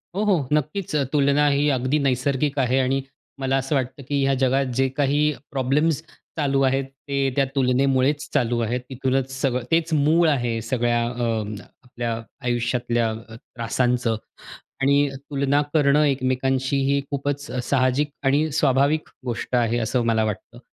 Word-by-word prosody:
हो, 205 - 0
हो. 180 -10 +1
नक्कीच 150 +3 -1 0.2
तुलना 145 0 +3
ही 145 +1 +2
अगदी 130 +2 +1
नैसर्गिक 135 +2 0
आहे 130 +1 +2
आणि 135 +1 +1 0.4
मला 135 0 +1
असं 135 +2 -1
वाटतं, 130 +1 -2
की 140 -1 0
ह्या 135 0 +2
जगात 135 +1 +2
जे 135 - +4
काही 145 +1 +2 0.3
प्रॉब्लेम्स 140 +3 +1 0.4
चालू 140 -3 +1
आहेत 135 +1 +2 0.2
ते 140 -1 +1
त्या 140 -1 +3
तुलनेमुळेच 135 +2 +2
चालू 120 -1 +1
आहेत. 125 +3 -2
तिथूनच 130 0 -1
सगळं 125 -2 0
तेच 165 0 +2
मूळ 155 +3 +4
आहे 120 -5 0
सगळ्या 120 +1 0
अ, 115 -4 -3 0.2
आपल्या 120 -2 -4 0.3
आयुष्यातल्या 120 -1 0
अ, 110 0 -8
त्रासांचं 120 0 -1 0.7
आणि 140 +1 +3 0.2
तुलना 140 0 +1
करणं 145 -1 +4
एकमेकांशी 130 0 0
ही 140 - +2
खूपच 145 0 -2 0.2
साहजिक 130 +2 +1 0.2
आणि, 145 +4 +2
स्वाभाविक 140 +1 +2 0.2
गोष्ट 120 +1 -3
आहे 120 0 +1
असं 120 +1 0
मला 110 -1 +2
वाटतं. 110 +3 -5
135 Hz, 145 wpm, -23 LUFS, 125-145 Hz, 0.7 s, जे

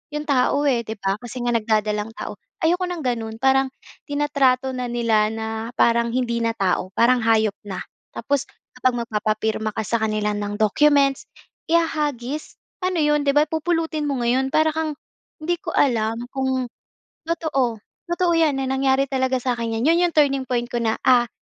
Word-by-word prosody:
'yong 300 0 -3
tao, 280 +1 +2
eh, 265 -4 +3
‘di 220 - -4
ba? 195 -1 -1
Kasi 245 +1 -7
nga 240 - +1
nagdadalang 215 -1 0
tao. - - -6 0.2
Ayoko 355 +3 +2
ng 350 -3 -5
gano’n, 230 -3 -2
parang 265 +2 +3 0.4
tinatrato 280 -3 +1
na 250 -1 -3
nila 230 -3 +2
na 220 0 -4 0.3
parang 235 0 +3
hindi 235 -1 -1
na 230 0 0
tao, 185 -2 0
parang 245 +2 +4
hayop 220 -2 +3
na. 190 -2 -5 0.3
Tapos 280 +3 -1 0.3
kapag 255 -1 0
magpapapirma 215 0 -1
ka 220 - -1
sa 230 +2 0
kanila 215 -1 0
ng 205 0 -3
documents, 275 +5 +3 0.4
ihahagis. 300 -4 -1 0.2
Ano 365 -1 0
‘yon, 295 -1 +3
‘di 285 - 0
ba, 295 +2 +4
pupulutin 320 -2 -1
mo 275 - -1
ngayon, 260 +3 +2
para 315 +2 +2
kang 315 -2 -2 0.4
hindi 340 +3 -1
ko - - -5
alam 225 -4 +2 0.2
kung 265 -1 0 0.6
totoo 275 -8 0 0.3
totoo 345 0 +1
‘yan 320 -4 +3
na 270 - -1
nangyari 265 +1 +2
talaga 260 -1 0
sa 250 0 -1
akin 230 -1 -3
‘yan. 230 - -1
‘Yon - - +2
‘yong - - -16
turning 275 -3 +3
point 240 -1 0
ko 240 0 -3
na, 225 -1 0
ah, 245 -2 +5
255 Hz, 175 wpm, -22 LUFS, 225-290 Hz, 0.6 s, ah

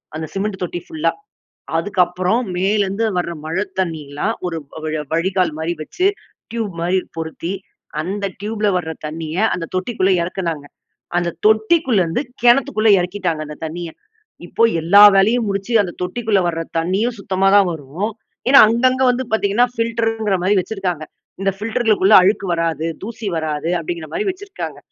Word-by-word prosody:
அந்த 160 0 -4
சிமெண்ட் 195 0 -2
தொட்டி 175 0 -4
ஃபுல்லா. 160 +1 0 0.7
அதுக்கு 190 +3 -3
அப்புறம் 185 +6 0
மேலருந்து 200 +3 +1
வர்ற 175 -1 -1
மழை 165 +5 -1 0.2
தண்ணீல்லாம் 160 +2 -2
ஒரு 165 -2 -3 0.2
வ 160 - -8
வழ 155 -1 -2
வழிகால் 180 0 +1
மாரி 160 +2 -1
வைச்சு, 360 - 0 0.4
டியூப் 225 -4 -3
மாரி 180 +2 +2 0.2
பொருத்தி, 165 +2 -4 0.5
அந்த 200 +5 -3 0.2
ட்யூப்ல 210 0 -1
வர்ற 160 -2 -3 0.2
தண்ணீய 160 +1 -5 0.2
அந்த 170 - -3
தொட்டிக்குள்ள 190 0 0
இறக்குனாங்க. 170 -4 -3 0.5
அந்த 175 -1 +1 0.2
தொட்டிக்குள்ளருந்து, 220 - +2 0.2
கிணத்துக்குள்ள 240 -2 +4
இறக்கிட்டாங்க 180 -3 -2
அந்த 150 - -8
தண்ணீய. 170 +2 -5 0.6
இப்போ 230 - 0 0.2
எல்லா 200 +6 +7
வேலையும் 220 +5 +3
முடிச்சு 200 +4 -3
அந்த 185 -3 -3
தொட்டிக்குள்ள 205 +3 0
வர்ற 165 -1 -2 0.2
தண்ணீயும் 195 +9 0
சுத்தமா 195 -1 0
தான் 200 -2 +6
வரும். 160 +8 -4 0.4
ஏன்னா 270 +2 +8
அங்கங்க 255 +3 +2
வந்து 250 +1 -2
பார்த்தீங்கன்னா 220 +2 +3
ஃபில்டரு 230 -1 0
ன்கிற 205 -3 +1
மாரி 190 +3 +2
வச்சிருக்காங்க. 185 -5 -3 0.4
இந்த 195 - +2
ஃபில்டர்களுக்குள்ள 215 -2 +2
அழுக்கு 195 +2 +2
வராது, 165 -1 -1 0.2
தூசி 225 0 -6
வராது 155 0 -2
அப்பிடீன்கிற 170 -1 -5
மாரி 420 - -1
வச்சிருக்காங்க. 390 +1 -6
190 Hz, 145 wpm, -19 LUFS, 165-220 Hz, 0.7 s, ஏன்னா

